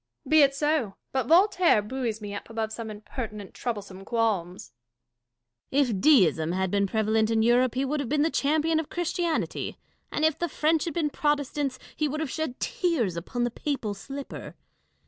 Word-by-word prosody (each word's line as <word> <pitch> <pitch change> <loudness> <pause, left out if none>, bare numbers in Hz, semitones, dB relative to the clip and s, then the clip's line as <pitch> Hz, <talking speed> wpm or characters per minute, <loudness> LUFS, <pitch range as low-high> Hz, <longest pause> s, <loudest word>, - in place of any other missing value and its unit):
Catharine. - - -12
Be 310 -1 +7
it 275 -1 +4
so; 295 -8 0 0.2
but 260 -3 -1
Yoltaire 355 - +4
buoys 235 -3 -3
me 205 -1 -6
up 200 - -7
above 220 -1 -3
some 225 0 -5
impertinent, 210 -1 -7
troublesome 200 -5 -5
qualms. 200 - -1 1.0
Dashkof. 275 -1 +3
If 195 -5 -2
Deism 170 - +4
had 190 0 0
been 200 -1 +2
prevalent 220 +1 +1
in 225 -1 +2
Europe, 245 +1 +3
he 265 +2 +1
would 295 +3 -1
have 275 -5 -3
been 295 0 +2
the 320 - +1
champion 315 +3 +2
of 320 - -4
Christianity; 345 -1 -2 0.3
and 305 - +1
if 315 -2 +1
the 345 - -1
French 310 +1 +1
had 330 - -4
been 310 -4 0
Protestants, 290 -2 0 0.2
he 305 - 0
would 300 +2 -3
have 310 -5 -2
shed 315 -6 -3
tears 295 - 0
upon 215 +8 -3
the 240 - 0
papal 250 -6 -3
slipper. 275 +7 -8
255 Hz, 185 wpm, -27 LUFS, 215-300 Hz, 1.0 s, Be